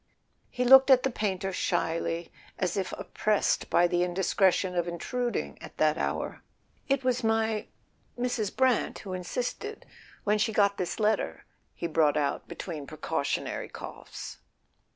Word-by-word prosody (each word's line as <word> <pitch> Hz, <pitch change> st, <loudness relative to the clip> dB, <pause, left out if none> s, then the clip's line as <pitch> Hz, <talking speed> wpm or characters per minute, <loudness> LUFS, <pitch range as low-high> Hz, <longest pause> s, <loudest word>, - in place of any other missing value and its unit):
He 250 Hz, -, -1 dB
looked 265 Hz, +2 st, +8 dB
at 260 Hz, -2 st, +7 dB
the 265 Hz, -, +1 dB
painter 195 Hz, -3 st, -2 dB
shyly, 165 Hz, -1 st, -1 dB, 0.3 s
as 180 Hz, -2 st, -1 dB
if 195 Hz, -2 st, -2 dB
oppressed 215 Hz, -1 st, 0 dB
by 175 Hz, -, +5 dB
the 175 Hz, 0 st, +1 dB
indiscretion 185 Hz, +1 st, +2 dB
of 175 Hz, -1 st, 0 dB
intruding 240 Hz, +8 st, -3 dB
at -, -, -11 dB
that -, -, +3 dB
hour. -, -, -2 dB, 0.5 s
"It 275 Hz, -1 st, +2 dB
was 255 Hz, -1 st, +1 dB
my—Mrs. 225 Hz, +1 st, -2 dB
Brant 260 Hz, -3 st, +2 dB
who 190 Hz, -, -4 dB
insisted—when 210 Hz, +1 st, -4 dB
she 220 Hz, +1 st, +1 dB
got 200 Hz, -1 st, +3 dB
this 180 Hz, -, -2 dB
letter," 210 Hz, -, 0 dB, 0.3 s
he -, -, -5 dB
brought 155 Hz, -3 st, +3 dB
out 145 Hz, -2 st, -1 dB
between 155 Hz, -6 st, -6 dB
precautionary 155 Hz, -, -2 dB
coughs. -, -, -8 dB
200 Hz, 130 wpm, -29 LUFS, 175-235 Hz, 0.5 s, looked